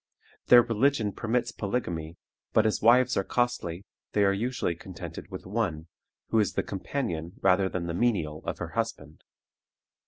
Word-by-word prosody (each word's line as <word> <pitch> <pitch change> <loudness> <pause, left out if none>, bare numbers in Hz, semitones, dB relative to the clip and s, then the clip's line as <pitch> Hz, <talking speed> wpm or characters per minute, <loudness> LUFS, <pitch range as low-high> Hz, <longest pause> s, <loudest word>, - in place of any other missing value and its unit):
Their 120 -1 +9
religion 115 -1 +1
permits 120 +4 -1
polygamy, 85 -7 -3 0.4
but 110 - +4
as 110 - +1
wives 125 +3 +5
are 95 - +2
costly, 100 -7 -1 0.3
they 105 - +3
are 100 0 +4
usually 115 -3 -1
contented 85 +1 -9
with - - -8
one, 90 -6 -2 0.4
who 115 - +3
is 105 - +1
the - - 0
companion 90 - -3
rather 95 0 +4
than 90 -2 -3
the 85 - -3
menial 85 -8 0
of - - -3
her - - -5
husband. 75 +2 -4
100 Hz, 155 wpm, -28 LUFS, 85-120 Hz, 0.4 s, Their